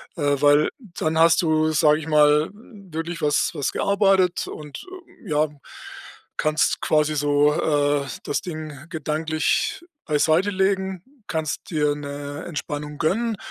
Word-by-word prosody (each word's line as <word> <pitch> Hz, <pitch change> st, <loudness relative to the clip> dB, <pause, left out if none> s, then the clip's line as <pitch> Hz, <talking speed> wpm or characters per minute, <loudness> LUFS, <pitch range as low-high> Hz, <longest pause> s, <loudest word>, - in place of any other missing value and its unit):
äh, 145 Hz, -4 st, +1 dB
weil 145 Hz, +1 st, +5 dB
dann 165 Hz, -8 st, -3 dB
hast 165 Hz, +1 st, +5 dB
du, 155 Hz, -2 st, +2 dB
sage 150 Hz, 0 st, +4 dB
ich 160 Hz, -, -8 dB
mal, 150 Hz, 0 st, +4 dB
wirklich 180 Hz, -6 st, -8 dB
was 150 Hz, -1 st, +2 dB
was 145 Hz, -4 st, -2 dB
gearbeitet 195 Hz, -3 st, +2 dB
und, 150 Hz, -2 st, -9 dB, 0.4 s
ja, 150 Hz, +1 st, +1 dB, 0.9 s
kannst 155 Hz, 0 st, +1 dB
quasi 155 Hz, 0 st, +2 dB
so, 145 Hz, 0 st, +3 dB
äh, 145 Hz, -2 st, +1 dB, 0.2 s
das 145 Hz, -, -2 dB
Ding 155 Hz, -4 st, -7 dB
gedanklich 155 Hz, -, -1 dB, 0.2 s
beiseitelegen, 190 Hz, +4 st, +1 dB, 0.2 s
kannst 160 Hz, -2 st, -3 dB
dir 150 Hz, -2 st, +1 dB
'ne 145 Hz, +1 st, -6 dB
Entspannung 150 Hz, -2 st, -5 dB
gönnen 220 Hz, +7 st, 0 dB
155 Hz, 120 wpm, -23 LUFS, 150-170 Hz, 0.9 s, weil